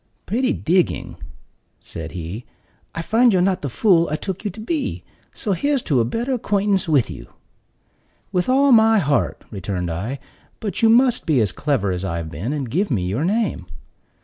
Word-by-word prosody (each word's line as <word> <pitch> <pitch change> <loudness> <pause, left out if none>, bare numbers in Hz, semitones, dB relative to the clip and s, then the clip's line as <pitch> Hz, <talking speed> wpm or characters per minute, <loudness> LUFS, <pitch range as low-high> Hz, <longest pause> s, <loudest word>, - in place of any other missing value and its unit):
"Pretty 255 +5 0
digging!" 180 +2 0 0.6
said 80 -1 -8
he. 90 +6 -6 0.5
"I 165 - -3
find 235 +6 +4
you're 185 - +3
not 185 0 +1
the 140 - -3
fool 170 - +3
I 150 - -1
took 190 +4 -5
you 210 - -1
to 200 +4 -10
be; 285 +6 -3 0.3
so 215 - -4
here's 275 - 0
to 140 -6 +1
a 115 - +2
better 235 - -2
acquaintance 200 -6 0
with 140 -8 +2
you." - - -9 1.0
"With 180 +3 0
all 275 +2 +4
my 225 -1 +6
heart," 145 -7 0
returned 90 -4 -3
I; 105 +12 -3 0.4
"but 205 -5 -4
you 225 - +5
must 245 0 +4
be 150 -5 +3
as 105 -5 +2
clever 100 -2 -1
as 90 0 -3
I've 85 -4 -3
been, 95 - -4
and 145 -4 -3
give 180 - 0
me 100 -10 0
your 105 +11 -1
name." 195 - -1
170 Hz, 180 wpm, -21 LUFS, -, 1.0 s, my